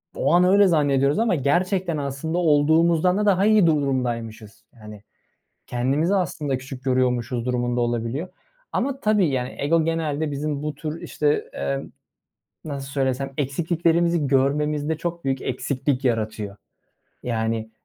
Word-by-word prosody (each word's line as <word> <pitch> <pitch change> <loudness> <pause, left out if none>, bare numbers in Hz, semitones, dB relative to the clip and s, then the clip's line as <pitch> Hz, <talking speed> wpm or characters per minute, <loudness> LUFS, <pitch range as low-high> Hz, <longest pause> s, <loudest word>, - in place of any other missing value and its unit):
O - - +1
an 175 +1 +5
öyle 200 +2 +5
zannediyoruz 145 -3 +2
ama 225 -5 +2
gerçekten 175 +4 0
aslında 140 +4 -3
olduğumuzdan 165 +2 +3
da 210 - 0
daha 195 -1 +3
iyi 215 -4 +5
durumdaymışız. 120 -7 -2 0.2
Yani, 105 -1 -11 0.6
kendimizi 140 +9 0
aslında 145 -7 -1
küçük 130 0 -9
görüyormuşuz 125 -2 0
durumunda 120 -1 0
olabiliyor 120 +7 -2 0.4
ama 270 +2 -1
tabii, 210 -3 +3
yani, 130 -2 -2
ego 160 +3 +2
genelde 160 -2 -1
bizim 145 0 -3
bu 150 0 -3
tür, 155 +2 -6
işte, 150 0 -1
emm, 70 0 -3 0.7
nasıl 140 -3 -5
söylesem, 135 0 -1
eksikliklerimizi 165 +3 +1
görmemizde 145 +3 +1
çok 170 0 -4
büyük 135 -1 -1
eksiklik 130 +1 -2
yaratıyor. 110 -4 -2 0.7
Yani, 110 -1 -2
145 Hz, 130 wpm, -23 LUFS, 125-165 Hz, 0.7 s, an